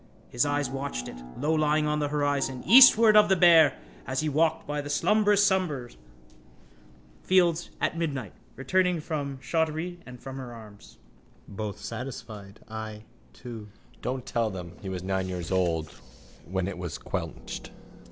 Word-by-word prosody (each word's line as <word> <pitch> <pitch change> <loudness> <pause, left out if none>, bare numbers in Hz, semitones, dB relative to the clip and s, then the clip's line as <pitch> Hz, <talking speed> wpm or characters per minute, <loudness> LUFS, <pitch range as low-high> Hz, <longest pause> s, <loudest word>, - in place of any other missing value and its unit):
His 125 +4 +1
eyes 145 0 0
watched 135 - -4
it, - - -9 0.2
lowlying 155 +1 +1
on 150 0 0
the 145 - 0
horizon, 145 -3 -1
eastward 230 -3 +8
of 210 -1 +7
the 190 - +5
bear, 165 -5 +6 0.3
as 130 +2 -1
he 155 - -1
walked 155 +3 +1
by 145 0 -3
the 145 - -8
slumberous 205 +6 +3
summer 165 -11 0 1.3
fields 175 -2 +2
at - - 0
midnight 140 - -3 0.2
returning 180 +5 +1
from 145 -3 -4
Shottery 160 +3 -2
and 125 0 -10
from 135 +1 -8
her 125 -3 -7
arms. 105 -3 -14 0.5
Both 105 0 -5
satisfied. 110 -4 -8
I 110 -1 -7 0.3
too. 115 -4 -9 0.3
Don't 130 0 -3
tell 115 -2 0
them 90 -4 -7
he 100 - -6
was 90 -1 -5
nine 95 0 -1
years 90 -2 -5
old 85 -4 0 0.6
when 95 0 -1
it 100 -2 -6
was 90 -3 -5
quenched. - - -6
135 Hz, 150 wpm, -27 LUFS, 110-160 Hz, 1.3 s, eastward